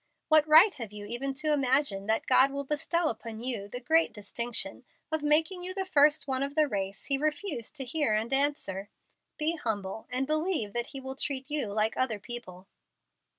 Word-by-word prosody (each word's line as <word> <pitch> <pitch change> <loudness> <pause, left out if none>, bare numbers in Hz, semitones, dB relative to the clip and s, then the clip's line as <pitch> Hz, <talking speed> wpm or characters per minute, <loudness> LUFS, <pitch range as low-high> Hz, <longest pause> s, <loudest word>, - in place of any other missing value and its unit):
What 310 -1 +5
right 330 +7 +7
have 230 -7 -8
you 210 0 -8
even 255 +5 -2
to 305 +3 +2
imagine 265 -7 +2
that 220 0 +2
God 260 +1 +5
will 280 0 -4
bestow 315 +4 0
upon 225 -1 -7
you 230 -4 -1
the 245 +4 -6
great 320 +6 +3
distinction 225 +1 -4 0.3
of 315 -1 0
making 315 +5 +2
you 370 +1 -5
the 385 -1 -1
first 300 -4 +3
one 260 -1 -1
of 280 +1 -3
the 310 -1 +3
race 195 -4 -4
He 275 -1 +1
refused 305 - -2
to 270 -3 -5
hear 255 -4 0
and 225 +4 -2
answer? 270 -9 0 0.5
Be 320 +2 0
humble 215 -5 -4
and 255 +2 -1
believe 310 - -1
that 240 0 -1
He 275 - -6
will 265 0 -7
treat 270 0 -3
you 295 -6 0
like 215 +2 0
other 245 -4 0
people." 195 -4 -7
270 Hz, 195 wpm, -29 LUFS, 220-305 Hz, 0.5 s, right